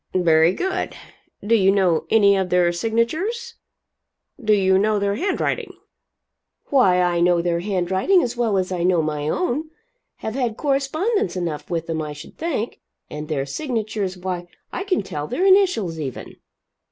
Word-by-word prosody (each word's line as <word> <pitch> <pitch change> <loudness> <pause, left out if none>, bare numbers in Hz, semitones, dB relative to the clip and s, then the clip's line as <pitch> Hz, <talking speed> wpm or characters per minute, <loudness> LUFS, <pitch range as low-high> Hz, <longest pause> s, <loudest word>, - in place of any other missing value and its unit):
"Very 165 -2 +4
good. 375 - -3 0.5
Do 225 - +2
you 195 -4 +5
know 185 -5 +2
any 200 -3 +5
of 190 -1 -1
their 180 -1 +3
signatures? 310 - -1 0.9
Do 215 - +2
you 190 -2 +3
know 210 +1 +2
their 200 0 0
handwriting?" 375 - -2 1.0
"Why 195 -10 +4
I 175 -1 +2
know 175 0 +3
their 170 0 0
handwriting 190 - +1
as 245 0 -3
well 230 -4 +1
as 185 0 -1
I 180 -2 -2
know 175 -2 +2
my 150 -1 -2
own 310 - -1 0.5
have 220 - -5
had 245 -3 -2
correspondence 310 - 0
enough 170 -5 -4
with 165 -2 -2
them, 160 -1 -2
I 150 -1 -5
should 150 +2 -12
think. 290 -9 -3 0.3
And 150 0 -6
their 145 -3 -1
signatures 215 - -3
why 180 -1 -4 0.3
I 385 - -3
can 370 - 0
tell 150 -5 -5
their 360 - -1
initials, 365 - +3
even." 135 -5 -6
195 Hz, 160 wpm, -22 LUFS, 175-255 Hz, 1.0 s, you